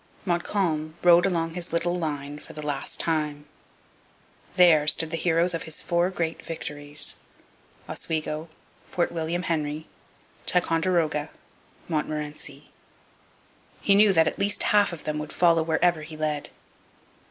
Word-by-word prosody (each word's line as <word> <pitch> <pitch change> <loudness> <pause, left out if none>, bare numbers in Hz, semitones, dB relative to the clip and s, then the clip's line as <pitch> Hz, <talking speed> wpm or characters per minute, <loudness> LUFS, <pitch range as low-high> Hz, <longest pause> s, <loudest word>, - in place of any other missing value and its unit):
Montcalm 170 -3 0
rode 175 +1 +7
along 165 -3 -1
his 175 0 -4
little 170 +1 0
line 145 -4 -3
for - - -13
the 150 -1 -7
last 145 -2 -3
time. 150 -3 0 1.1
There 165 -5 +6
stood 155 +1 +1
the - - -1
heroes 170 +1 +2
of 165 - -2
his 155 - -3
four 175 +1 +1
great 165 -3 -3
victories 145 -2 -5 0.7
Oswego, 155 0 -3 0.4
Fort 175 - 0
William 170 +1 -2
Henry, 155 -2 -2 0.6
Ticonderoga, 165 -3 +1 0.6
Montmorency. 150 -2 -4 1.1
He 200 - +3
knew 205 +1 +6
that 165 -3 +5
at - - -2
least 200 +1 +1
half 205 -2 +4
of 170 - -8
them 150 0 -2
would 150 0 -6
follow 170 -2 +4
wherever 165 +1 +2
he 155 0 -9
led. 150 -1 -2
165 Hz, 130 wpm, -26 LUFS, 150-175 Hz, 1.1 s, rode